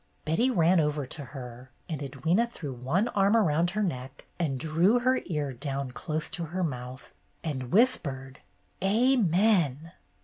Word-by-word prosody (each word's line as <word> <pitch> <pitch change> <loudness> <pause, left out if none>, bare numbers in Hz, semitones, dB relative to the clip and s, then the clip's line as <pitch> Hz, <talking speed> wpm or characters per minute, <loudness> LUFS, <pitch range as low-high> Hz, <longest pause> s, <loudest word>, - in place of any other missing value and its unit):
Betty 195 +12 +2
ran 175 -5 +4
over 150 -2 0
to 145 +2 -7
her, 125 -1 -9 0.2
and 155 -5 -4
Edwyna 160 - 0
threw 150 - -6
one 140 - 0
arm 200 +2 +3
around 170 -4 +2
her 210 +3 -1
neck 130 -6 -5
and 140 -6 -1
drew 165 - +3
her 255 +1 +2
ear 150 -5 -2
down 135 0 -4
close 155 +5 -3
to 170 -1 -4
her 180 +4 -3
mouth, 125 -4 -5 0.3
and 130 -6 -4
whispered 135 - +1 0.4
''Amen! 195 - +2
160 Hz, 145 wpm, -28 LUFS, 135-195 Hz, 0.4 s, ran